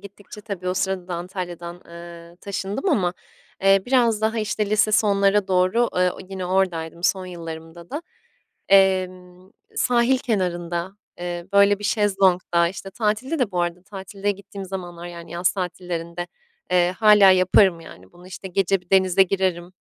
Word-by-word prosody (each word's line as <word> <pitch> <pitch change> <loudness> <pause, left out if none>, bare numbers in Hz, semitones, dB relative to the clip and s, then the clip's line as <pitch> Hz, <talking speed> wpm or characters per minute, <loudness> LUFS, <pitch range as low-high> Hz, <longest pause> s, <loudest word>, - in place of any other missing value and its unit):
gittikçe 200 +1 -12
tabii 200 -4 -5
o 180 - -1
sırada 190 -1 -2
da 180 - -3
Antalya'dan, 175 -1 -6
ııı, 170 0 -12
taşındım 200 - -4
ama, 190 - +1 0.5
eee, 195 0 +5
biraz 240 -4 +2
daha, 220 +1 0
işte, 215 -1 -2
lise 215 0 +3
sonlara 200 -2 +3
doğru, 185 +6 +2
ııı, 180 0 +3
o - - -12
yine 190 -2 -5
oradaydım 175 -3 -1
son 190 -1 +1
yıllarımda 165 -1 -9
da. 295 +4 -4 0.7
Emm, 185 -1 +2 0.2
sahil 250 - +2
kenarında, 180 -6 -2 0.3
eee, 175 0 -5
böyle, 200 0 +5
bir 210 - -9
şezlongda, 190 -5 +2
işte, 195 +2 -8
tatilde 225 - -1
de 250 -6 0
bu 180 -2 -1
arada 175 +1 -2
tatilde 195 +1 -5
gittiğim 200 0 -7
zamanlar, 175 -2 -7
yani, 170 -1 -10
yaz 175 +1 +1
tatillerinde, 175 -2 -5 0.4
eee, 180 -1 +3
hâlâ 210 -3 +7
yaparım, 185 -1 +4
yani, 95 - -14
bunu. 175 +1 -16
İşte, 190 +1 -8
gece 195 +1 +1
bir 180 - -30
denize 190 -1 +4
girerim. 185 -2 -1
185 Hz, 155 wpm, -22 LUFS, 175-200 Hz, 0.7 s, hâlâ